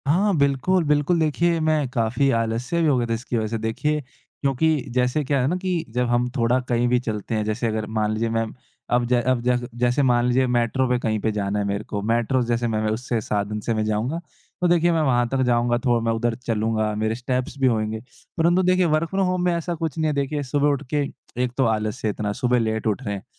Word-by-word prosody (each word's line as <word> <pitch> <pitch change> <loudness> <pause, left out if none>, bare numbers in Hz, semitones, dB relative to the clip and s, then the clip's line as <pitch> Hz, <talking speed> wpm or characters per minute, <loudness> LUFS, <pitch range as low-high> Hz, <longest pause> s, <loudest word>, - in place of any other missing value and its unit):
हाँ, 195 +7 +3
बिल्कुल, 140 +6 +2
बिल्कुल। 150 +3 +2
देखिए, 165 +2 +1
मैं 155 -3 +1
काफ़ी 120 +2 +1
आलस्य 115 +8 -1
भी 160 - +3
हो 140 -4 +3
गया 120 -1 0
था 115 - -1
इसकी 120 +1 -3
वज़ह 110 -1 -1
से। 115 +1 -2
देखिए, 150 +7 0 0.4
क्योंकि 140 +3 +2 0.2
जैसे 125 +4 +1
क्या 140 -1 +1
है 125 - +1
ना 170 - 0
कि 180 -2 -1
जब 125 0 +1
हम 120 +1 +1
थोड़ा 120 +1 +2
कहीं 120 0 +2
भी 125 0 +3
चलते 110 -2 -4
हैं, 110 - 0
जैसे 110 +3 -1
अगर 110 -1 -2
मान 105 0 +1
लीजिए, 115 +1 -1
मैं 115 0 0 0.5
अब 120 0 +2
जै 120 0 +2
अब 125 0 +1
जै 125 +1 +2 0.2
जैसे 125 +3 +2
मान 120 -2 +3
लीजिए, 130 +1 +2
मेट्रो 125 +2 +1
पे 125 - +2
कहीं 110 -3 -1
पे 110 - 0
जाना 105 -1 -1
है 100 - -1
मेरे 100 +1 -2
को, 105 -1 -4
मेट्रो 120 +4 +1
जैसे 120 0 0
मैं 110 -1 -1
मैं 110 - +1
उससे 120 +1 -2
साधन 105 0 -2
से 115 - +2
मैं 110 -1 0
जाऊँगा। 110 +9 -1 0.4
तो 180 - +3
देखिए, 175 0 +3
मैं 165 -1 +2
वहाँ 120 -4 +2
तक 135 +1 0
जाऊँगा, 120 0 +2
तो 120 -2 +1
मैं 115 0 0
उधर 115 0 0
चलूँगा, 110 -1 0
मेरे 110 +1 -1
स्टेप्स 125 +2 -3
भी 135 - +4
होएँगे। 110 -2 0 0.4
परंतु 175 +3 +3
देखिए, 185 0 +3
वर्क 160 0 +1
फ्रॉम 195 0 +1
होम 180 -1 0
में 175 - +2
ऐसा 170 +1 -2
कुछ 165 -1 -4
नहीं 160 -1 +1
है। 150 - +1
देखिए, 145 +1 -1
सुबह 140 +2 +1
उठ 140 0 -1
के 145 -1 +2 0.4
एक 125 - -1
तो 135 - +3
आलस्य 110 0 -2
इतना, 105 0 -2
सुबह 125 0 +1
लेट 110 -1 -1
उठ 110 +5 -1
रहे 100 -4 -2
हैं। 95 - -8
125 Hz, 240 wpm, -23 LUFS, 115-145 Hz, 0.5 s, भी